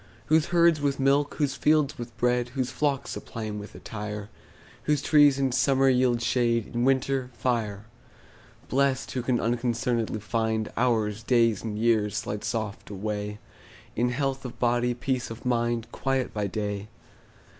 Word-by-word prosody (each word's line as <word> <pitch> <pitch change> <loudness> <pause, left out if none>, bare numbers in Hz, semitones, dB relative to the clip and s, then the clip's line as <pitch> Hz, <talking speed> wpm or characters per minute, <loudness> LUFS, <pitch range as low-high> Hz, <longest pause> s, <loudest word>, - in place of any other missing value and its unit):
Whose 160 0 +3
herds 170 -3 +4
with 140 -1 0
milk, 140 +2 +2
whose 145 -3 0
fields 150 +1 +2
with 120 -1 -8
bread, 125 0 +1
Whose 130 -1 0
flocks 140 0 -1
supply 115 -3 -6
him 105 -1 -4
with 105 - -10
attire; 105 -1 -6 0.6
Whose 150 -1 +2
trees 145 -3 +5
in 135 -1 +1
summer 135 +1 +3
yield 125 -2 +2
shade, 115 -1 +1
In 120 0 0
winter, 135 -1 +1
fire. 110 -3 -2 0.8
Blest, 135 0 +1
who 125 - -2
can 125 0 +1
unconcern'dly 120 -1 0
find 110 0 -1
Hours, 110 -3 +1
days, 115 -3 +3
and 110 -2 -4
years, 110 -2 +2
slide 105 0 -4
soft 110 -3 -3
away 105 +1 -4 0.6
In 120 +2 +1
health 135 +1 -1
of 125 - -7
body, 120 0 +1
peace 130 0 -2
of 115 +2 -9
mind, 120 -2 0
Quiet 135 -1 -1
by 105 -1 -1
day. 105 0 -3
120 Hz, 155 wpm, -27 LUFS, 110-135 Hz, 0.8 s, trees